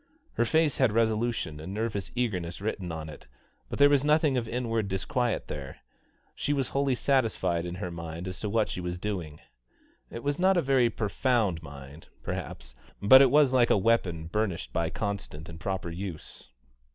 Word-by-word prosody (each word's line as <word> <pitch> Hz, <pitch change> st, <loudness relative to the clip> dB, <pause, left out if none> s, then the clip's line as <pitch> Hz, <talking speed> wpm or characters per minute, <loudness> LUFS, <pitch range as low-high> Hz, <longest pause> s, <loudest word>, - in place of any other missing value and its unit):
Her 120 Hz, -, +1 dB
face 160 Hz, +2 st, +2 dB
had 130 Hz, -5 st, +3 dB
resolution 110 Hz, -7 st, 0 dB
and 90 Hz, +6 st, -6 dB
nervous 110 Hz, -3 st, -2 dB
eagerness 90 Hz, -9 st, -2 dB
written 100 Hz, -4 st, -3 dB
in 80 Hz, -1 st, -5 dB
it, 75 Hz, -, -11 dB, 0.4 s
but -, -, -4 dB
there 145 Hz, -, +7 dB
was 145 Hz, -2 st, +3 dB
nothing 150 Hz, -1 st, +3 dB
of 120 Hz, -3 st, -1 dB
inward 115 Hz, -3 st, -1 dB
disquiet 115 Hz, +5 st, -1 dB
there; 70 Hz, -3 st, -7 dB, 0.6 s
she 145 Hz, -, -1 dB
was 135 Hz, -3 st, -1 dB
wholly 135 Hz, -1 st, +1 dB
satisfied 110 Hz, -11 st, +1 dB
in 85 Hz, -, -5 dB
her 90 Hz, -, -5 dB
own -, -, -8 dB
mind 85 Hz, +1 st, -6 dB
as 90 Hz, -1 st, -6 dB
to 105 Hz, -, -3 dB
what 110 Hz, 0 st, +2 dB
she 90 Hz, -, -5 dB
was 90 Hz, 0 st, -4 dB
doing. 90 Hz, -6 st, -5 dB, 0.7 s
It 115 Hz, -, -7 dB
was 145 Hz, +2 st, -1 dB
not 190 Hz, +1 st, +4 dB
a -, -, +4 dB
very 130 Hz, -3 st, +3 dB
profound 110 Hz, -4 st, 0 dB
mind, 70 Hz, 0 st, -11 dB, 0.2 s
perhaps, 60 Hz, 0 st, -5 dB, 0.3 s
but 130 Hz, +7 st, +8 dB
it 135 Hz, -, +6 dB
was 145 Hz, -1 st, +4 dB
like 125 Hz, -2 st, +4 dB
a -, -, +5 dB
weapon 95 Hz, -6 st, +1 dB
burnished 95 Hz, +1 st, -2 dB
by 85 Hz, -1 st, 0 dB
constant 100 Hz, -6 st, -5 dB
and 80 Hz, -1 st, -9 dB
proper 95 Hz, -2 st, -3 dB
use. 85 Hz, -7 st, -7 dB
105 Hz, 185 wpm, -28 LUFS, 85-125 Hz, 0.7 s, but